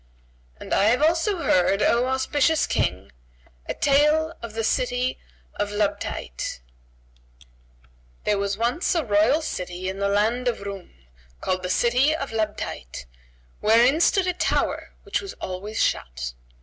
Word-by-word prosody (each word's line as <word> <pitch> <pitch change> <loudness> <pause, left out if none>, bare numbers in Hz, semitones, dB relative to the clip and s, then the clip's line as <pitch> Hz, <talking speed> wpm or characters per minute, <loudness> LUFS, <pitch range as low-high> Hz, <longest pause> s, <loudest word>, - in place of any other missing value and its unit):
And - - -5
I 200 - +4
have 245 +7 +3
also 335 +3 +2
heard, 190 +3 +3
O 240 +2 +3
auspicious 285 +4 +2
King, 90 0 -1 0.6
a - - -3
tale 300 +3 +3
of 230 -2 -7
THE 225 - -1
CITY 250 +3 0 0.4
OF 205 0 -1
LABTAYT.[FN#139] - - -6 0.8
There 210 - +1
was 200 0 -1
once 240 +11 0
a 325 -4 0
royal 220 +9 +3
city 180 -8 -4
in 190 +1 -6
the 200 0 +1
land 220 +5 +1
of 235 -4 -1
Roum, 200 -2 -7 0.5
called 185 0 -1
the 180 - -4
City 250 +9 +3
of 275 -5 -5
Labtayt 210 - -4 0.5
wherein 240 +8 +4
stood 375 +2 +3
a 365 - 0
tower 360 - -1
which 410 - -2
was 395 0 -7
always 195 +4 -5
shut. 60 0 -1
220 Hz, 140 wpm, -24 LUFS, 185-275 Hz, 0.8 s, I